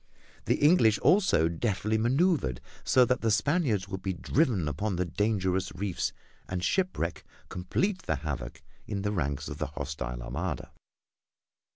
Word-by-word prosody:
The -, -, +3 dB
English 145 Hz, -, +5 dB
also 185 Hz, -, +4 dB
deftly 105 Hz, +4 st, -1 dB
maneuvered 130 Hz, -, +2 dB, 0.2 s
so 125 Hz, -1 st, +5 dB
that 125 Hz, +1 st, 0 dB
the 115 Hz, -, +1 dB
Spaniards 110 Hz, -, +1 dB
would 95 Hz, -1 st, -5 dB
be 95 Hz, -1 st, -2 dB
driven 115 Hz, -, +1 dB
upon 95 Hz, +8 st, -2 dB
dangerous 95 Hz, +1 st, 0 dB
reefs, 100 Hz, -3 st, -2 dB, 0.4 s
and 90 Hz, -1 st, -3 dB
shipwreck 180 Hz, -, 0 dB, 0.3 s
complete 180 Hz, -, -1 dB
the 80 Hz, -, +2 dB
havoc 70 Hz, -4 st, -5 dB, 0.2 s
in 100 Hz, -2 st, -3 dB
the 105 Hz, -, 0 dB
ranks 70 Hz, -8 st, -2 dB
of -, -, -6 dB
the -, -, -1 dB
hostile 70 Hz, -4 st, -5 dB
Armada. 85 Hz, +11 st, -4 dB
95 Hz, 140 wpm, -29 LUFS, 80-120 Hz, 0.4 s, English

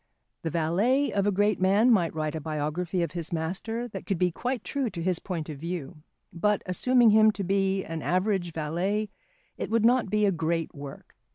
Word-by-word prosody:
The 165 Hz, -, -2 dB
valet 195 Hz, -, +1 dB
of 200 Hz, 0 st, +1 dB
a -, -, +3 dB
great 205 Hz, 0 st, +1 dB
man 205 Hz, +6 st, +4 dB
might 175 Hz, -8 st, +2 dB
write 155 Hz, -1 st, -2 dB
a 160 Hz, -, -4 dB
biography 160 Hz, +4 st, -2 dB
of 170 Hz, -, -3 dB
his 170 Hz, -1 st, -5 dB
master 190 Hz, +9 st, -3 dB
that -, -, -8 dB
could 195 Hz, -, 0 dB
be 180 Hz, +1 st, +2 dB
quite 245 Hz, +6 st, -3 dB
true 275 Hz, -4 st, -2 dB
to 170 Hz, -4 st, -6 dB
his 180 Hz, -1 st, +1 dB
point 170 Hz, -5 st, -4 dB
of 150 Hz, -3 st, -7 dB
view; 170 Hz, -2 st, -5 dB, 0.4 s
but, 210 Hz, +4 st, +1 dB
assuming 240 Hz, +5 st, +4 dB
him 215 Hz, 0 st, +6 dB
to 200 Hz, -, -4 dB
be 195 Hz, 0 st, +1 dB
an 165 Hz, -1 st, -5 dB
average 185 Hz, -1 st, 0 dB
valet, 180 Hz, +7 st, -2 dB, 0.5 s
it -, -, -3 dB
would 225 Hz, 0 st, +2 dB
not 245 Hz, -3 st, +3 dB
be 210 Hz, +1 st, +2 dB
a 200 Hz, -, +3 dB
great 165 Hz, -1 st, -1 dB
work. 140 Hz, -1 st, -10 dB
185 Hz, 200 wpm, -27 LUFS, 165-210 Hz, 0.5 s, him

